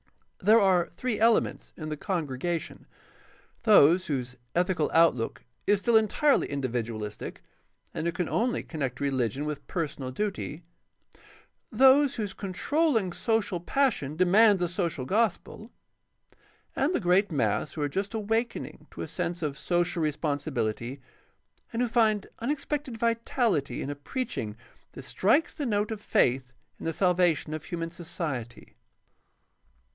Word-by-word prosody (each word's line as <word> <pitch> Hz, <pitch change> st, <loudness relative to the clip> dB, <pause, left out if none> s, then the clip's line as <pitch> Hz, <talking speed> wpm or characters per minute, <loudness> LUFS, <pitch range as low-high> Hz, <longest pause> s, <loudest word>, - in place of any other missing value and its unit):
There 215 Hz, +4 st, +6 dB
are 185 Hz, -4 st, +3 dB
three 245 Hz, +3 st, -2 dB
elements 225 Hz, +1 st, +2 dB
in 155 Hz, -2 st, -5 dB
the 155 Hz, -, -2 dB
congregation: 165 Hz, -1 st, -3 dB, 0.7 s
those 185 Hz, -5 st, +6 dB
whose 125 Hz, -3 st, -3 dB, 0.2 s
ethical 175 Hz, -3 st, +1 dB
outlook 160 Hz, -9 st, +2 dB, 0.2 s
is 205 Hz, -1 st, +4 dB
still 235 Hz, +1 st, +2 dB
entirely 220 Hz, +7 st, +3 dB
individualistic 115 Hz, -6 st, -4 dB, 0.5 s
and 165 Hz, -, -2 dB
who -, -, +1 dB
can 175 Hz, 0 st, -2 dB
only 240 Hz, +2 st, 0 dB
connect 135 Hz, -6 st, -4 dB
reHgion 135 Hz, -1 st, -1 dB
with 150 Hz, -2 st, -5 dB
personal 145 Hz, -6 st, -3 dB
duty; 180 Hz, 0 st, -4 dB, 1.1 s
those 270 Hz, +1 st, +5 dB
whose 205 Hz, -4 st, -3 dB
controlling 220 Hz, -, 0 dB
social 220 Hz, -5 st, 0 dB
passion 175 Hz, -, 0 dB
demands 190 Hz, +2 st, +5 dB
a -, -, +2 dB
social 170 Hz, -7 st, -2 dB
gospel; 220 Hz, -, -1 dB, 1.1 s
and 295 Hz, +7 st, +1 dB
the -, -, +2 dB
great 185 Hz, 0 st, +3 dB
mass 150 Hz, +1 st, 0 dB
who 150 Hz, -, -3 dB
are -, -, +1 dB
just 195 Hz, +8 st, -3 dB
awakening 225 Hz, +2 st, -2 dB
to -, -, -7 dB
a -, -, -5 dB
sense 175 Hz, 0 st, -3 dB
of 145 Hz, -2 st, -2 dB
social 175 Hz, +1 st, 0 dB
responsibihty 145 Hz, -5 st, -2 dB, 0.7 s
and 235 Hz, +2 st, 0 dB
who -, -, +1 dB
find 220 Hz, -3 st, +2 dB
unexpected 275 Hz, 0 st, -3 dB
vitality 230 Hz, -, 0 dB
in 140 Hz, -, -3 dB
a -, -, -5 dB
preaching 145 Hz, -, -4 dB, 0.4 s
that 135 Hz, -, -9 dB
strikes 220 Hz, -, +2 dB
the 290 Hz, -4 st, -3 dB
note 210 Hz, 0 st, 0 dB
of 215 Hz, -2 st, -5 dB
faith 130 Hz, -7 st, +1 dB, 0.3 s
in -, -, -8 dB
the 165 Hz, -, -1 dB
salvation 175 Hz, -3 st, +2 dB
of 155 Hz, 0 st, -5 dB
human 165 Hz, -2 st, -4 dB
society. 155 Hz, -8 st, -6 dB
175 Hz, 135 wpm, -28 LUFS, 145-220 Hz, 1.1 s, There